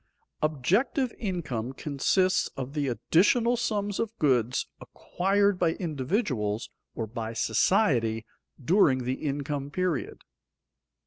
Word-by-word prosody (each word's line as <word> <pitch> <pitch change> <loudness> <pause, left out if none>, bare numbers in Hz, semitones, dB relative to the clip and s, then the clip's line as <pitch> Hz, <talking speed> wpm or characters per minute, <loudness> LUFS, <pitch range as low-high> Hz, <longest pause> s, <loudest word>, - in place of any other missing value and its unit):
_Objective 195 - +1
income 145 - -3
consists 170 +7 +1
of 135 +1 -5
the 145 -2 -1
additional 210 - +3
sums 205 -4 -2
of 225 0 -3
goods 125 -4 +2
acquired 195 +1 0
by 165 -2 +2
individuals 130 - -2 0.2
or 115 - -2
by 110 +1 -5
society 115 - +2 0.3
during 135 -3 +3
the 125 +1 -1
income 140 -1 -2
period. 180 -2 -2
150 Hz, 105 wpm, -27 LUFS, 125-195 Hz, 0.3 s, additional